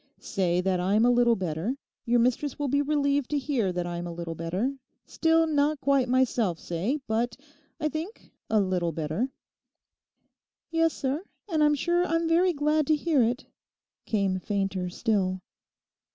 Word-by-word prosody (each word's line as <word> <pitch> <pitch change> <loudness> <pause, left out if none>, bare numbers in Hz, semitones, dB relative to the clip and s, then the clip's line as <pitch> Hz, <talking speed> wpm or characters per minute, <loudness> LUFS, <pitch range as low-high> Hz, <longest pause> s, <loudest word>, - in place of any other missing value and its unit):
'Say 180 -3 0
that 185 -1 0
I'm 200 +5 +3
a 245 - +5
little 240 -1 +4
better; 180 - -2 0.3
your 240 +1 +3
mistress 250 +4 +1
will 290 - -1
be 285 +2 +2
relieved 285 -2 +1
to 295 - 0
hear 260 -9 0
that 175 -1 -2
I'm 175 0 -4
a - - -5
little 170 -1 -5
better; 180 - -2 0.3
still 325 0 +2
not 300 -1 +1
quite 275 -3 +2
myself 240 -8 +2
say, 180 - -2
but, 225 +1 -1 0.4
I 305 - 0
think, 315 - -6 0.2
a 220 - +3
little 185 -3 0
better.' 160 - -2 1.4
'Yes, 330 -1 +2
sir; 280 +5 -2 0.2
and 320 -5 +1
I'm 295 0 +4
sure 345 +4 +1
I'm 330 -1 0
very 350 +3 +4
glad 300 -1 +1
to 310 - +4
hear 300 -2 +2
it,' 240 +4 0 0.6
came 195 -3 +1
fainter 195 -2 -2
still. 185 -1 0
245 Hz, 160 wpm, -27 LUFS, 185-295 Hz, 1.4 s, a